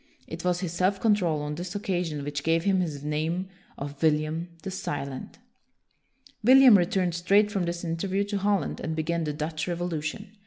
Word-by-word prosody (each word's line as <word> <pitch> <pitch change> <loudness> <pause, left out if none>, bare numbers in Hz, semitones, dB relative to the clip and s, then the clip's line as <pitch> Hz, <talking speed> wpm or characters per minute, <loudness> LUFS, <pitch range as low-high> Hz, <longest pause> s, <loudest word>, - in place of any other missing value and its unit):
It - - -7
was 180 0 +1
his 180 -4 -3
self 185 +3 +1
control 180 -9 +2
on 150 0 -3
this 175 +4 -6
occasion 175 -7 -2
which 145 0 -3
gave 165 +2 +1
him 195 -1 +2
his 150 -6 -3
name 160 +5 -2 0.3
of 140 0 -7
William 155 +1 +1 0.2
the 195 - -4
Silent. 140 -7 -5 1.1
William 260 0 +8
returned 180 -1 +2
straight 200 +5 +3
from 195 -4 0
this 170 0 -3
in 165 -1 -2
terview 195 +3 -1
to 205 -1 -1
Holland 200 0 0
and 160 - -3
began 165 +1 -1
the 150 - -2
Dutch 155 +1 -3
Revolution. 175 +4 -4
175 Hz, 180 wpm, -27 LUFS, 155-195 Hz, 1.1 s, William